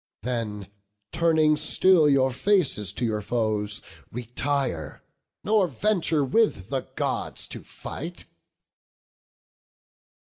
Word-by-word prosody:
Then 115 -5 -3 0.5
turning 160 -2 +3
still 160 +1 +5
your 135 -2 +3
faces 135 - +2
to 120 - -2
your 110 -2 -1
foes, 105 -2 -1 0.3
Retire, 125 - -3 0.4
nor 210 -2 +3
venture 165 - +1
with 135 - +1
the - - -1
Gods - - -2
to - - -7
fight." - - -8
130 Hz, 95 wpm, -25 LUFS, 110-165 Hz, 0.5 s, still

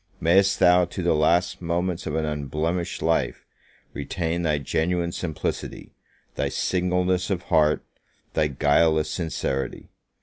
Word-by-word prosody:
May'st 95 +3 +4
thou, 90 0 +5
to 90 +1 -6
the 85 - +3
last 85 +5 +2
moments 85 +1 -2
of 75 - -2
an 80 -1 0
unblemished 75 +4 -2
life, 80 0 0 0.5
retain 85 -1 -2
thy 80 -3 +1
genuine 85 +5 -1
simplicity, 80 -4 -4 0.4
thy - - -1
singleness 90 +1 0
of 90 -3 -1
heart, 75 -1 +2 0.5
thy 80 -1 +2
guileless 75 +2 +2
sincerity! 70 -6 -3
85 Hz, 125 wpm, -24 LUFS, 75-90 Hz, 0.5 s, thou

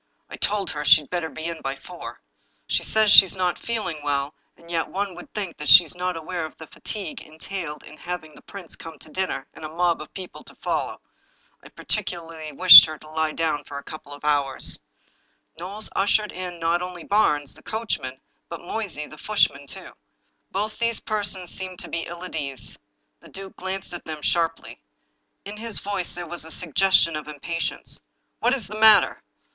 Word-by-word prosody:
" - - -46
I - - -5
told 205 -1 -1
her 150 - -4
she'd 150 0 +5
better 175 -3 -2
be 160 - -8
in 165 -1 -4
by 135 0 -3
four. 175 +5 -10 0.4
She - - 0
says 220 -1 +4
that - - +9
she's 190 -1 +8
not 180 -2 0
feeling 210 -10 -3
well, 140 0 -1 0.2
and 170 0 -14
yet 165 -2 0
one 195 0 -3
would 285 - -12
think 195 -5 -5
that 150 -2 -3
she 180 - +11
was 165 - -6
not 180 -1 -2
aware 165 +1 -4
of 155 - -8
the 160 - -9
fatigue 195 0 -7
entailed 160 0 -7
in 150 - -13
having 175 -3 -6
the - - -16
prince 195 -5 -9
come 165 -2 -10
to 155 - -14
dinner, 185 -7 -2
and 160 - -12
a 155 - -5
mob 170 0 +1
of 155 - -10
people 185 -2 -8
to - - -13
follow. - - -3 0.6
I - - -13
particularly 165 -3 -3
wished 180 +5 +12
her 155 -1 -7
to 155 - -15
lie 160 0 0
down 160 -3 -1
for 140 - -8
a 140 - -7
couple 155 -2 -10
of 145 +1 -10
hours." 145 -2 +2 0.8
Knowles 200 +5 -3
ushered 205 +2 +2
in 180 -1 -6
not 165 +1 +1
only 180 -2 -6
Barnes, 150 -9 +2
the - - -14
coachman, 145 - -4 0.3
but 170 - -7
Moysey, 180 -5 -4
the 155 - -13
footman, 140 -10 +1
too. - - -9 0.6
Both 210 +3 -3
these 230 -1 +1
persons 200 -4 -2
seemed 185 -1 -5
to - - -4
be 165 - -3
ill 175 +1 -8
at 180 - -8
ease. 140 -4 -2 0.4
The - - -16
duke 195 0 -9
glanced 190 0 -5
at 175 - -8
them 155 -2 -7
sharply. 165 -1 -1 0.7
In 205 +1 -7
liis 225 -1 +1
voice 200 -3 -3
there 175 0 -5
was 170 0 -7
a 160 - -10
suggestion 170 0 +2
of 150 -1 -6
impatience. 155 +2 -4 0.2
" - - -49
What 250 - +3
is 235 -8 0
the 215 +2 -7
matter? 220 -2 +6
170 Hz, 200 wpm, -24 LUFS, 155-195 Hz, 0.8 s, wished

